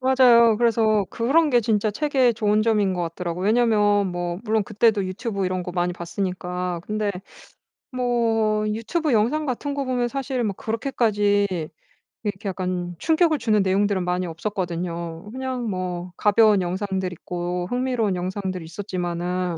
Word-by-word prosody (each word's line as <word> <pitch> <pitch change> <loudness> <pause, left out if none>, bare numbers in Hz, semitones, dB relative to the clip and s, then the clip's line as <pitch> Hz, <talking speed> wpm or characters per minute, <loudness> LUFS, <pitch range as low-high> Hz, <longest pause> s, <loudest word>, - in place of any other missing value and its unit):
맞아요. 245 -4 +5
그래서 220 -2 +2
그런 295 +7 +2
게 245 -2 +4
진짜 215 -1 +1
책의 265 -1 +2
좋은 215 -1 +2
점인 210 -4 +2
것 180 - -2
같더라고요. 170 +1 -4
왜냐하면 210 -3 +3
뭐 175 0 -3
물론 220 -1 +1
그때도 215 0 +2
유튜브 200 +1 -3
이런 185 0 -1
거 180 - -5
많이 175 0 0
봤으니까 180 0 -3
근데 215 -1 -1 0.8
뭐 225 -4 +1
유튜브 250 +8 -1
영상 245 +8 +2
같은 285 +2 -3
거 280 -1 -2
보면 250 -2 0
사실은 265 -3 -2
뭐 200 - -3
그렇게까지 215 -4 +1 0.8
이렇게 205 -1 -3
약간 180 -1 -3
충격을 320 - +2
주는 220 -4 +2
내용들은 195 0 +1
많이 180 +1 -1
없었거든요. 170 -1 -4
그냥 255 -2 -3
뭐 180 -2 -4
가벼운 210 -1 +4
영상들이 190 0 -2
있고 175 0 -3
흥미로운 245 -5 0
영상들이 185 -1 -4
있었지만은 180 -1 -3
205 Hz, 345 characters per minute, -23 LUFS, 180-235 Hz, 0.8 s, 맞아요